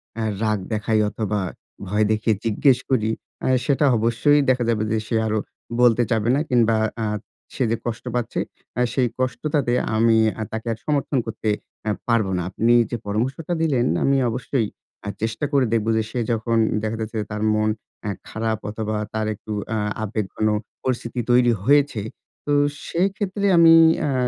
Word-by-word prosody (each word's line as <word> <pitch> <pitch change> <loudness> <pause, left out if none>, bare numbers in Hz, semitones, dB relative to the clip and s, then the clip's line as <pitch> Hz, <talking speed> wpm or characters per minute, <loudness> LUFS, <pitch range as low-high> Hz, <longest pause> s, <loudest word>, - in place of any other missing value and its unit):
অ্যা 115 -1 -2 0.2
রাগ 110 -2 +1
দেখাই 110 +1 +1
অথবা, 105 -1 -2 0.5
ভয় 105 +3 +2
দেখিয়ে 110 0 +1
জিজ্ঞেস 125 +4 +3
করি, 110 -4 +2 0.3
অ্যা - - 0 0.2
সেটা 145 +1 +2
অবশ্যই 115 +7 +3
দেখা 125 -1 +3
যাবে 110 -2 +1
যে 110 - +2
সে 115 - -1
আরো 110 0 0 0.4
বলতে 120 -1 +5
চাবে 110 0 +1
না, - - +1
কিংবা 115 -3 +3 0.2
অ্যা 110 -1 -1 0.5
সে - - -1
যে 115 - +1
কষ্ট 115 0 -4
পাচ্ছে, 120 -2 -2 0.4
অ্যা 125 - +2
সেই 125 -2 +2
কষ্টটাতে 130 0 0 0.2
আমি 115 0 +4 0.2
আর 110 - -2
তাকে 110 +1 -3 0.2
সমর্থন 145 -1 0
করতে 110 -1 -3 0.3
অ্যা 110 - 0 0.2
পারবো 110 -5 +2
না। - - -1
আপনি 115 +5 +2 0.2
যে 120 - -1
পরামর্শটা 130 +11 -2
দিলেন 135 -7 +2 0.2
আমি 135 0 +3
অবশ্যই 120 0 -1 0.3
অ্যা 100 - -4
চেষ্টা 110 +5 -1
করে 140 -3 +3
দেখব 110 -1 +1
যে 110 - +1
সে 125 - -2
যখন 115 0 0 0.3
দেখা 110 +1 -2
যাচ্ছে 110 +1 -4
তার 105 - -3
মন 110 0 +1 0.3
অ্যা 105 - -2 0.2
খারাপ 110 -1 -2
অথবা, 110 0 -3 0.2
তার 110 0 -1
একটু 110 - -10 0.2
অ্যা 110 -1 -1 0.2
আবেগঘন 110 0 -2 0.4
পরিস্থিতি 120 -1 -2
তৈরি 120 0 +5
হয়েছে। 140 -2 +3 0.4
তো 145 - 0 0.3
সেক্ষেত্রে 195 +2 -1
আমি 165 -1 +8 0.3
অ্যা 140 - 0
115 Hz, 165 wpm, -22 LUFS, 110-130 Hz, 0.5 s, আমি